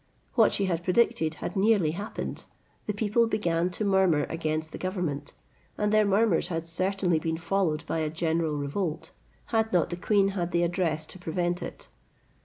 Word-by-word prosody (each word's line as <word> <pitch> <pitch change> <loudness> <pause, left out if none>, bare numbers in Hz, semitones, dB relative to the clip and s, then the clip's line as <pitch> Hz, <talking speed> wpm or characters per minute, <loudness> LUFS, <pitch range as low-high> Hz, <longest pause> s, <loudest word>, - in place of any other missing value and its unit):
What - - +5
she 200 - +1
had 175 -2 -1
predicted 180 -5 +2
had - - -5
nearly 195 -5 +3
happened: 200 +6 -5 0.4
the 210 - 0
people 220 +2 +2
began 175 -6 0
to 195 +4 -3
murmur 190 -6 +3
against 155 -1 -2
the - - -7
government, 180 -6 -3 0.4
and 210 0 0
their 215 -1 +4
murmurs 200 -3 +3
had 165 -2 -3
certainly 185 0 +1
been 160 +1 -2
followed 165 -2 0
by 165 - -2
a 155 -1 0
general 160 0 0
revolt, 150 +4 -3 0.4
had 220 0 +2
not 175 -2 +2
the 175 - -3
queen 200 +1 +2
had 175 -3 -3
the 170 0 +3
address 170 -3 0
to 185 - -8
prevent 175 +1 -1
it. - - -8
175 Hz, 175 wpm, -27 LUFS, 160-200 Hz, 0.4 s, What